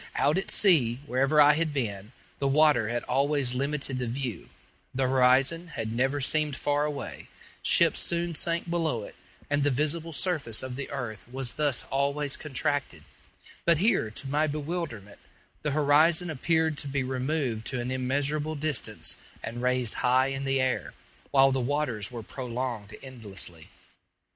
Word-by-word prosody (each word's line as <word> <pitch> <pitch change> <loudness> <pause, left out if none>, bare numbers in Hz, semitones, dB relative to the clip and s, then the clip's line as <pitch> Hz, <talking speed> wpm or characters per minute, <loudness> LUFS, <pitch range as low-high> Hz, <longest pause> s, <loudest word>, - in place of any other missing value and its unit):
Out 150 +6 +3
at 195 - -5
sea, 130 - +4
wherever 135 +3 +2
I 150 0 +8
had 155 -1 0
been, 105 -5 -3 0.3
the 140 - +1
water 145 -5 +4
had 120 0 -2
always 140 -1 +1
limited 135 0 -2
the 125 - -2
view; 120 -5 -4 0.5
the 135 - +1
horizon 130 +6 +3
had 110 -8 -4
never 135 +4 +1
seemed 150 +1 +1
far 145 +2 0
away; 145 -2 -5 0.3
ships - - +4
soon 170 0 -1
sank 170 +2 -1
below 165 -9 -1
it, - - -9 0.3
and 145 0 +1
the 145 - +3
visible 155 +5 0
surface 150 - 0
of 130 -1 -5
the 140 +1 -5
earth 120 -7 -5
was 130 -2 -3
thus 145 -5 0
always 140 +1 0
contracted; 145 - -2 0.6
but 170 -2 +4
here, 185 - +2
to 125 +5 -8
my 150 +3 +1
bewilderment, 150 - -4 0.4
the 150 - -1
horizon 155 +4 +4
appeared 160 +1 +1
to - - -5
be 140 -1 -1
removed 130 -3 -2
to 130 - -1
an 120 +1 -3
immeasurable 145 +4 0
distance 150 -3 -2 0.3
and 120 +2 -5
raised 125 -2 +1
high 130 +2 +3
in 135 0 -3
the 135 0 +1
air, 130 0 -1 0.3
while 135 -1 +5
the 130 0 0
waters 125 -6 -1
were 120 -2 -7
prolonged 120 -4 -5
endlessly. 100 - -8
135 Hz, 160 wpm, -28 LUFS, 125-150 Hz, 0.6 s, I